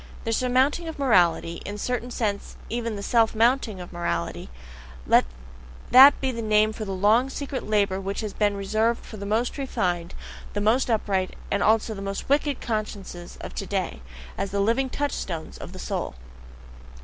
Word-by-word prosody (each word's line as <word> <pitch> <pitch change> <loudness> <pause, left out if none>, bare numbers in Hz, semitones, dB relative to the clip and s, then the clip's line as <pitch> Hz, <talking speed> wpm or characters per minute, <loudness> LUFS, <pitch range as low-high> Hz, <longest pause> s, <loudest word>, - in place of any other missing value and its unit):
The 225 - -1
surmounting 260 +7 +2
of 320 - -6
morality, 175 - +2
in 205 - -5
a - - -7
certain 245 +2 -2
sense 210 -4 -3
even 230 -1 -2
the 200 - -6
self 225 0 +2
mounting 230 -3 +2
of 180 0 -9
morality 85 - -3 0.6
let - - +5 0.7
that 270 +3 +9
be 265 -1 0
the 230 -2 -4
name 215 0 +3
for 215 - -5
the 195 - -5
long 215 +7 +3
secret 275 -2 -5
labour 200 -3 +1
which 195 +3 -3
has 215 -2 -4
been 205 -1 +1
reserved 220 +4 0
for 215 - -9
the 200 0 -6
most 230 +6 0
refined, 180 -10 -2 0.4
the 205 - -1
most 225 +6 +2
upright, 195 -4 0 0.2
and 200 - +1
also 220 +1 +3
the 195 - -7
most 195 +3 -5
wicked 285 -1 +2
consciences 205 -5 -5
of - - -7
today, - - -3 0.4
as 200 - -1
the 200 - -2
living 235 +6 +1
touchstones 195 - -4
of - - -8
the - - -10
soul. - - -3
215 Hz, 175 wpm, -25 LUFS, 195-245 Hz, 0.7 s, that